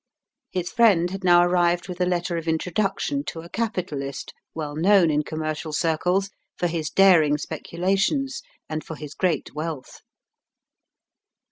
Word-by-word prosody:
His 180 Hz, -1 st, -3 dB
friend 200 Hz, -7 st, +4 dB
had 195 Hz, 0 st, -6 dB
now 175 Hz, -1 st, +6 dB
arrived 175 Hz, 0 st, +2 dB
with 180 Hz, -1 st, -6 dB
a 180 Hz, -, +2 dB
letter 175 Hz, -1 st, -1 dB
of 165 Hz, 0 st, -4 dB
introduction 195 Hz, -, -1 dB
to 165 Hz, -, -5 dB
a 170 Hz, -, -12 dB
capitalist, 170 Hz, -, -4 dB, 0.2 s
well 150 Hz, -2 st, -4 dB
known 175 Hz, 0 st, +4 dB
in 150 Hz, 0 st, +2 dB
commercial 155 Hz, 0 st, -4 dB
circles 180 Hz, +5 st, 0 dB, 0.3 s
for -, -, -1 dB
his 165 Hz, -2 st, -1 dB
daring 165 Hz, -7 st, +5 dB
speculations 195 Hz, -, -1 dB, 0.3 s
and 155 Hz, 0 st, -4 dB
for 160 Hz, -, -7 dB
his 150 Hz, -1 st, -8 dB
great 180 Hz, -3 st, -1 dB
wealth. 155 Hz, -3 st, -6 dB
175 Hz, 140 wpm, -24 LUFS, 155-190 Hz, 0.3 s, now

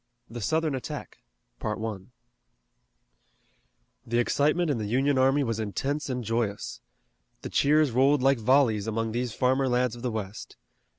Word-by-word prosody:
THE 120 Hz, +1 st, -7 dB
SOUTHERN 155 Hz, +7 st, 0 dB
ATTACK 130 Hz, -, -6 dB, 0.4 s
The 105 Hz, -1 st, -2 dB, 2.4 s
excitement 150 Hz, +7 st, +2 dB
in 130 Hz, -, -1 dB
the 105 Hz, -, -3 dB
Union 135 Hz, +4 st, +2 dB
army 135 Hz, +2 st, +3 dB
was 115 Hz, -3 st, -2 dB
intense 135 Hz, +8 st, -2 dB
and 125 Hz, -1 st, -2 dB
joyous. 110 Hz, -2 st, -2 dB, 0.6 s
The -, -, -5 dB
cheers 150 Hz, -1 st, +3 dB
rolled 135 Hz, +3 st, +3 dB
like 135 Hz, -2 st, +4 dB
volleys 115 Hz, -3 st, +3 dB
among 115 Hz, 0 st, -1 dB
these 120 Hz, 0 st, -3 dB
farmer 130 Hz, +1 st, +2 dB
lads 125 Hz, -1 st, +1 dB
of 120 Hz, -, -10 dB
the 125 Hz, -, -1 dB
West. 110 Hz, -2 st, -6 dB
125 Hz, 135 wpm, -27 LUFS, 115-140 Hz, 2.4 s, like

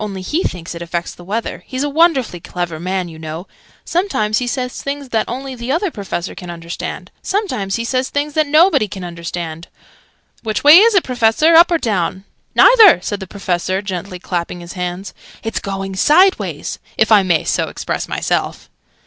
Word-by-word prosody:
Only 195 Hz, -3 st, -5 dB
he 310 Hz, -, -1 dB
thinks 175 Hz, -, -4 dB
it 170 Hz, -, -8 dB
affects 170 Hz, 0 st, -4 dB
the 175 Hz, -, -14 dB
weather. 215 Hz, +6 st, -4 dB
He's 260 Hz, +1 st, -3 dB
a -, -, 0 dB
wonderfully 285 Hz, -, +2 dB
clever 170 Hz, -2 st, -5 dB
man, 185 Hz, +1 st, -2 dB
you 160 Hz, -2 st, -11 dB
know. 160 Hz, +3 st, -6 dB, 0.4 s
Sometimes 275 Hz, -, 0 dB
he 250 Hz, -, -3 dB
says 250 Hz, 0 st, -3 dB
things 280 Hz, -1 st, -5 dB
that 225 Hz, -2 st, -1 dB
only 265 Hz, +3 st, -5 dB
the 245 Hz, +1 st, -5 dB
Other 345 Hz, +5 st, 0 dB
Professor 195 Hz, -, -5 dB
can 180 Hz, -2 st, -9 dB
understand. 170 Hz, 0 st, -6 dB
Sometimes 370 Hz, -, -2 dB
he 230 Hz, -, -3 dB
says 255 Hz, +2 st, -1 dB
things 290 Hz, +1 st, -2 dB
that 310 Hz, 0 st, +1 dB
nobody 305 Hz, -, +4 dB
can 190 Hz, -2 st, -8 dB
understand! 170 Hz, -1 st, -6 dB, 0.7 s
Which 215 Hz, -2 st, -2 dB
way 295 Hz, +4 st, +10 dB
is 450 Hz, +1 st, +5 dB
it, 375 Hz, -, +4 dB
Professor? 250 Hz, +6 st, +3 dB
Up 335 Hz, +2 st, +8 dB
or 340 Hz, -, +2 dB
down?" 190 Hz, -, -1 dB, 0.3 s
"Neither!" 450 Hz, -, +8 dB
said 205 Hz, +2 st, -3 dB
the 190 Hz, -, -7 dB
Professor, 185 Hz, 0 st, -2 dB
gently 185 Hz, -1 st, -5 dB
clapping 175 Hz, -1 st, -4 dB
his 170 Hz, 0 st, -9 dB
hands. 180 Hz, +1 st, -5 dB, 0.3 s
"It's 225 Hz, 0 st, -2 dB
going 195 Hz, -1 st, -5 dB
sideways 360 Hz, -, +2 dB, 0.2 s
if 220 Hz, 0 st, +2 dB
I 210 Hz, -2 st, +7 dB
may 175 Hz, -4 st, +1 dB
so -, -, 0 dB
express -, -, -4 dB
myself." -, -, -2 dB
210 Hz, 185 wpm, -17 LUFS, 180-285 Hz, 0.7 s, way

